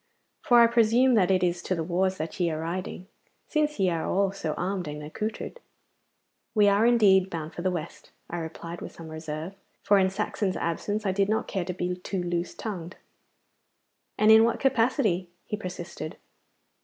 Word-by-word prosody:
For 240 -1 +5
I - - +9
presume 235 +2 +4
that 195 -5 +4
it 185 -1 +3
is 175 -1 0
to 185 - -1
the 165 - -2
wars 185 +3 0
that 160 +3 -5
ye 175 -2 +2
are 155 -1 -3
riding, 180 +2 -4 0.4
since 300 -4 0
ye 185 -2 +3
are 165 -1 -1
all 195 0 +1
so 170 -6 -3
armed 185 -1 -2
and 150 0 -6
accoutred.' 215 - -5 1.0
'We 205 -1 +6
are 205 +3 +4
indeed 195 -6 +5
bound 160 -3 -5
for - - -6
the 185 - +1
West,' 170 -2 -6 0.2
I 175 - -5
replied, 165 +1 -7
with - - -7
some 165 -1 -10
reserve, 160 +2 -6 0.3
for 205 -1 +5
in 190 0 +3
Saxon's 190 0 -2
absence 205 +6 -2
I 190 - +2
did 195 +1 +1
not 220 - 0
care 190 -4 -2
to 180 - -3
be 180 0 -2
too 180 0 -4
loose 175 0 -2
tongued. 185 -5 -6 1.2
'And 215 +1 +5
in 220 0 +8
what 230 - +1
capacity?' 225 -8 +1 0.2
he - - -3
persisted. 180 -5 -7
185 Hz, 185 wpm, -27 LUFS, 170-210 Hz, 1.2 s, I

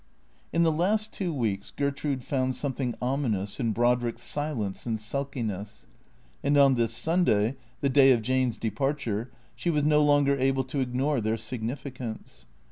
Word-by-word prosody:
In 170 - +3
the 165 - +4
last 210 +7 +1
two 185 -4 -2
weeks 110 -9 -2
Gertrude 140 -2 -1
found 130 -1 0
something 130 -2 -2
ominous 120 -7 -1
in 115 -4 +1
Brodrick's 120 +1 +1
silence 130 -10 -3
and 110 -2 -1
sulkiness. 110 -4 -4 0.6
And 145 +1 +3
on 140 -1 +6
this 115 -3 +1
Sunday, 130 - +2 0.3
the 140 - +2
day 135 0 +6
of 120 -3 +3
Jane's 130 -1 +1
departure, 120 -2 -2 0.3
she 175 - -2
was 150 -3 +2
no 150 0 +4
longer 145 -1 +4
able 135 0 +2
to 130 +2 -4
ignore 130 +1 0
their 110 +1 0
sig 115 +2 -5
nificance. 125 -1 -6
130 Hz, 155 wpm, -27 LUFS, 115-145 Hz, 0.6 s, on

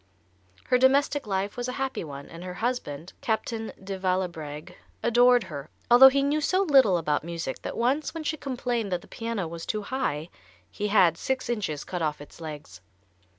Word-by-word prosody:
Her 250 0 +2
domestic 275 0 +3
life 195 0 -1
was 245 0 -3
a 250 - -3
happy 265 -4 -2
one, 140 -2 -8
and 170 +1 -10
her 180 -1 -6
husband, 180 - -3
Captain 225 0 -2
de 195 0 -5
Vallebregue, 170 -5 -2 0.3
adored 245 0 +5
her, 145 -1 -8 0.2
although 260 +2 +10
he 275 +1 +1
knew 295 +2 +1
so 370 +5 +2
little 265 - +5
about 150 -3 0
music 165 -5 -5
that - - -5
once 265 +6 +1
when 325 -1 -6
she 315 - -1
complained 245 -7 -2
that 180 -1 -1
the - - -15
piano 230 -6 -3
was 165 0 -7
too 215 -1 -2
high 175 - -2 0.4
he 210 - -2
had 180 -5 +4
six 265 -2 -1
inches 175 -10 -2
cut 180 -2 -4
off 150 -2 -1
its 145 +3 -13
legs. 145 - -8
205 Hz, 185 wpm, -27 LUFS, 165-255 Hz, 0.4 s, although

